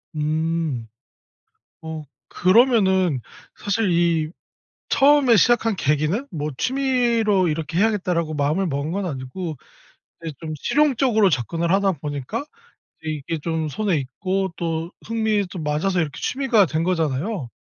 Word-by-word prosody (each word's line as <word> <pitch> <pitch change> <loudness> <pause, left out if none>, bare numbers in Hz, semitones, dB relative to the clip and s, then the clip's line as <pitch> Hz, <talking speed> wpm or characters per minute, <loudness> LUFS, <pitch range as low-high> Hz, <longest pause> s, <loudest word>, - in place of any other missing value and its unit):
음. 155 -5 -1 1.0
어 160 -1 -6 0.3
그러면은 190 - +3 0.4
사실 205 -1 0
이 170 -2 +2 0.6
처음에 275 -4 +5
시작한 225 0 +3
계기는 155 - 0
뭐 150 -2 -3
'취미로 240 -7 +2
이렇게 160 +2 -2
해야겠다.'라고 180 -7 +1
마음을 150 +7 0
먹은 145 0 -2
건 195 0 -2
아니고 150 +3 -5 0.7
이제 160 -3 -5
좀 160 -1 -5
실용적으로 255 -8 +3
접근을 165 +6 -1
하다 195 0 +3
보니까 145 - -4 0.6
이게 155 +1 -3
좀 160 -1 -1
손에 195 +1 0
익고 185 +7 -2
또 165 0 -3 0.2
흥미도 215 -5 -1
맞아서 155 +5 0
이렇게 150 -5 -3
취미가 250 -7 +2
된 160 +2 -1
거잖아요. 165 - -1
170 Hz, 275 characters per minute, -22 LUFS, 155-210 Hz, 1.0 s, 처음에